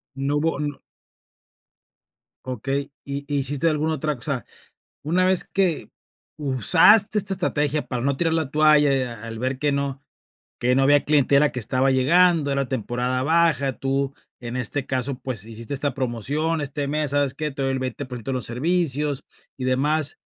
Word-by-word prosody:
No 140 +2 -1
hubo, 160 -1 0
no. 145 -1 -4 1.7
Okey, 135 +3 -3
y 140 0 -4
y 145 - +1
hiciste 140 +4 +1
alguna 155 +1 0
otra 150 0 -2
cosa, 125 -1 -3 0.6
una 180 +4 +2
vez 185 -1 +2
que 185 -5 -1 0.5
usaste 180 - +4
esta 195 -1 0
estrategia 150 -5 0
para 125 -2 -3
no 140 0 0
tirar 165 +1 0
la 160 -4 -1
toalla, 150 -2 +4
y 130 - +1
a 115 -3 -6
al 115 -1 -6
ver 130 +1 -2
que 145 0 +1
no 140 0 -2 0.6
que 125 +1 +2
no 135 - +3
había 145 +1 +4
clientela 145 0 +4
que 125 - -3
estaba 130 +4 +1
llegando, 155 +2 +4
era 140 -1 0
temporada 125 +1 -2
baja, 150 -4 +2
tú 135 0 -1 0.3
en 120 +1 -6
este 135 +2 0
caso, 130 +1 -1
pues, 115 -6 -4
hiciste 115 +3 -7
esta 140 -1 -1
promoción, 140 +6 -1
este 145 0 -3
mes, 150 -1 -1
¿sabes 145 -2 +1
qué? 150 -1 -3
te 135 - -6
doy 135 0 0
el 130 - -2
20% 130 -1 -5
de - - -2
los 125 - -3
servicios 145 +1 -1 0.3
y 130 - -6
demás, 145 +3 +1
140 Hz, 170 wpm, -23 LUFS, 130-150 Hz, 1.7 s, usaste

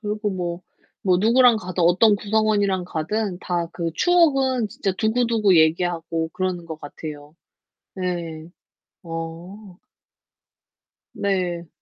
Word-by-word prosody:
그리고 210 -1 -2
뭐, 175 -2 -4 0.4
뭐 185 -2 +3
누구랑 235 +3 +5
가든 180 -3 -3
어떤 185 +5 +5
구성원이랑 205 -3 +1
가든 180 +3 -2
다 175 -1 -2
그 170 -2 -3
추억은 270 - +3
진짜 195 -1 -2
두고두고 220 -2 +2
얘기하고 165 0 +1
그러는 185 -2 -2
것 160 -2 -8
같아요. 145 0 -9 0.6
네. 170 -3 -4 0.5
어. 170 +4 -8 1.4
네. 180 -4 -2
185 Hz, 225 characters per minute, -22 LUFS, 170-215 Hz, 1.4 s, 누구랑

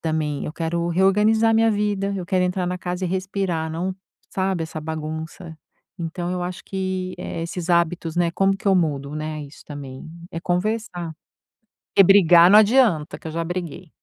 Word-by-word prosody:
também. 155 -3 -2
Eu - - -5
quero 170 +1 -2
reorganizar 210 +5 +3
minha 225 0 +4
vida, 205 -1 -1
eu 180 - -4
quero 185 +1 +1
entrar 180 0 -1
na 180 0 -2
casa 180 +1 -3
e - - -1
respirar, 185 -3 -2
não, 180 +4 -3 0.4
sabe, 190 -3 -1
essa 160 -1 -6
bagunça. 160 +2 -6 0.4
Então 175 +1 -4
eu 180 - -2
acho 180 0 -5
que, 185 -1 -3
eh, 165 - -5
esses 175 +1 -5
hábitos, 170 -1 +1
né, 175 -1 +2
como 195 +2 +2
que 200 - -12
eu 190 - +5
mudo, 145 -4 -1
né, 155 0 -4
isso 145 +1 -13
também. 140 -1 -8 0.2
É 165 - -5
conversar. 180 -1 -2 0.8
Porque 195 - +8
brigar 175 -2 +7
não 210 - +9
adianta, 215 - +3
que - - -24
eu 160 - -5
já 165 +1 -2
briguei. 175 0 -5
175 Hz, 180 wpm, -22 LUFS, 160-190 Hz, 0.8 s, não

